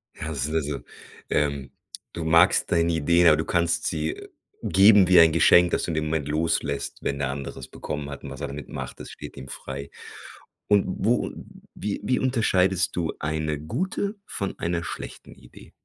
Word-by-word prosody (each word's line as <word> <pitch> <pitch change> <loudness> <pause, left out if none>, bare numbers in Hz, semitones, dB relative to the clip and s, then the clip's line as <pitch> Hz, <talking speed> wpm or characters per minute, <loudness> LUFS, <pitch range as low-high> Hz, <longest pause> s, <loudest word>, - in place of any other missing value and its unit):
Ja 80 - -6
das 70 -5 -3
sind 75 +3 -2
also, 75 -3 -1 0.5
ähm 70 -2 -1 0.4
du 85 - -5
magst 85 +3 +4
deine 85 0 +2
Idee, 85 +2 +3
aber 75 -1 +6
du 80 - -2
kannst 85 -1 0
sie 80 -1 -2 0.4
geben 100 +1 +6
wie 90 -2 +8
ein 80 -1 +6
Geschenk, 85 +2 +5
das - - 0
du - - -2
in - - -3
dem 75 0 -1
Moment 75 -2 -2
loslässt, 75 -2 -1
wenn 70 - -2
der 70 -2 -1
andere 70 0 -6
es 65 0 -9
bekommen 75 -1 -6
hat 70 - -8
und - - -6
was - - -9
er 70 - -2
damit 70 0 -8
macht, - - -7
das - - -9
steht - - -10
ihm 65 - -8
frei. 70 +1 -7 0.8
Und 105 -1 +4
wo 110 +5 0 0.4
wie 105 -1 -4
wie 125 - +1
unterscheidest 95 -7 +1
du 85 -2 -1
eine 75 -1 -2
gute 190 - -3
von 100 - -5
einer 85 0 -1
schlechten - - -8
Idee? - - -16
80 Hz, 190 wpm, -25 LUFS, 75-90 Hz, 0.8 s, wie